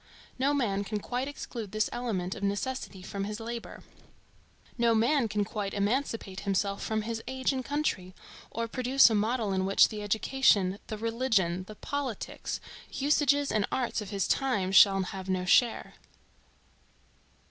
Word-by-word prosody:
No 275 +2 +3
man 215 -9 0
can 210 +1 -3
quite 250 +5 -3
exclude 235 -7 -6
this 215 +1 +1
element 210 -7 -2
of - - -9
Necessity 200 0 -3
from 195 +1 -4
his 210 +1 -5
labor. 230 +1 -7 0.9
No 235 -1 +3
man 240 +3 +3
can 210 -1 -1
quite 205 -2 -4
emancipate 205 -2 -1
himself 200 0 -1
from 220 -1 -1
his 225 0 -4
age 260 +1 -1
and 260 -1 -3
country, 235 -10 -2 0.3
or 230 +1 -3
produce 255 +1 +4
a - - +2
model 215 0 0
in 190 0 0
which 195 +1 +5
the 210 -1 -6
education, 205 -2 +2
the 215 - -5
religion, 220 -6 0
the 215 - -9
politics, 275 -2 -4 0.3
usages 285 0 +2
and 210 -2 +1
arts 245 -3 -1
of 205 - -7
his 200 -2 -1
times 205 -9 0
shall 195 -1 +8
have 190 0 -6
no 185 -1 0
share. 230 +5 +3
220 Hz, 155 wpm, -29 LUFS, 200-255 Hz, 0.9 s, shall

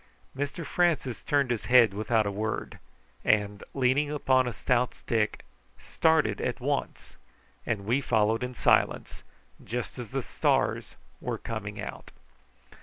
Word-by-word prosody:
Mr 145 +5 -4
Francis 160 -8 0
turned 140 -3 +1
his 115 - -2
head 120 -5 +6
without 110 +1 +1
a 100 - -1
word, 110 +2 -4 0.4
and, 105 -1 +1
leaning 135 +2 +2
upon 130 -3 +2
a - - -1
stout 125 +1 0
stick, 110 -2 -1 0.3
started 160 -11 +1
at - - -2
once; - - -3 0.5
and 105 -4 -1
we 120 +6 +1
followed 110 -3 +2
in 125 0 -4
silence, - - +1 0.4
just 125 +2 -5
as 120 -3 -6
the 135 -1 -2
stars - - 0 0.2
were - - -3
coming 105 -2 -6
out. 105 - -7
120 Hz, 135 wpm, -28 LUFS, 110-135 Hz, 0.5 s, head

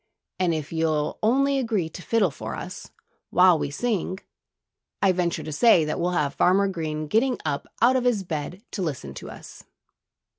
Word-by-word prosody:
And 180 -2 +2
if 155 0 -5
you'll 155 -2 0
only 275 +5 +2
agree 220 -9 0
to 180 - -9
fiddle 205 -4 +1
for - - -6
us, - - -8 0.4
while 180 -2 +5
we - - -2
sing, 190 +2 -2 0.8
I 195 - +4
venture 175 -2 -1
to 155 - -6
say 165 +1 +5
that 155 - -2
we'll 175 +1 +1
have 145 -2 0
Farmer 195 +2 +3
Green 155 -4 -3
getting 235 - +1
up 140 - -2 0.2
out 250 +2 +5
of 255 -1 +1
his 230 -6 +2
bed 170 +3 -5
to 200 - -4
listen 135 - -4
to - - -9
us." - - -11
180 Hz, 180 wpm, -25 LUFS, 155-220 Hz, 0.8 s, while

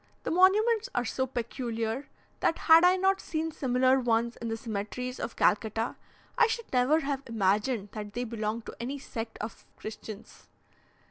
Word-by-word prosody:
The - - -2
monuments 425 +6 +4
are 245 - +1
so 260 +3 -1
peculiar, 235 0 -3 0.3
that 325 - +2
had 325 +1 +7
I 360 +1 +6
not 385 +1 +2
seen 320 0 -2
similar 260 -1 +2
ones 235 -1 +1
in 235 - -5
the 225 0 -2
cemeteries 225 +4 -4
of 235 - -4
Calcutta, 220 +2 +1 0.4
I 465 - +7
should 460 - -4
never 260 +6 +4
have 280 -2 -2
imagined 210 0 +1
that 210 -1 -7
they 245 +2 -2
belonged 220 -1 -3
to - - -8
any 260 +4 -3
sect 225 -4 -6
of 215 +2 -6
Christians. 215 0 -9
245 Hz, 160 wpm, -29 LUFS, 225-305 Hz, 0.4 s, had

